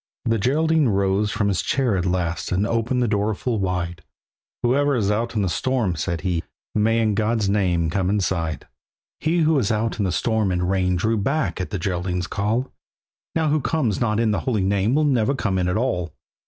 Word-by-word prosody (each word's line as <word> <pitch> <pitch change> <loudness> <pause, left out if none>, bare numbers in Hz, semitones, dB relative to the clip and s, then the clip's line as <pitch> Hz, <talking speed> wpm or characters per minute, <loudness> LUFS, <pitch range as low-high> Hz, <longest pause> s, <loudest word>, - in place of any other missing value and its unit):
The 115 -1 +1
Geraldine 155 +6 +2
rose 100 +1 +1
from 105 -2 0
his 100 -3 +1
chair 130 -6 +1
at 90 -1 -1
last 90 -2 -1
And 95 +3 +1
opened 115 +3 0
the - - +1
door 105 0 0
full 115 +1 -2
wide; 90 -3 -2 0.6
"Whoever 140 +4 +2
is 105 -4 +1
out 115 +3 -1
in 105 - +1
the - - 0
storm," 115 -1 0
said 85 -1 -2
he, 85 -2 -1 0.3
"May 110 +2 +2
in 110 -2 +2
God's 110 0 +1
name 90 -5 +1
come 95 0 0
inside!" 90 -6 -1 0.5
He 165 +2 +1
who 160 0 +3
was 125 -8 +1
out 110 +1 -1
in - - +1
the 90 - 0
storm 110 0 0
and 90 0 0
rain 90 -1 +1
Drew 110 +5 +1
back 135 +1 -1
at 90 - -4
the 105 - -3
Geraldine's 90 -1 -2
call. 110 +7 -1 0.6
"Now 160 -2 +2
who 150 0 +2
comes 130 - 0
not 105 -2 +1
in 115 -2 +2
the 100 - 0
Holy 110 -7 0
Name 100 +5 +1
Will 155 - +3
never 135 -2 +2
come 100 -7 -1
in 90 - 0
at 90 +3 0
all." 90 - -1
105 Hz, 210 wpm, -22 LUFS, 95-120 Hz, 0.6 s, who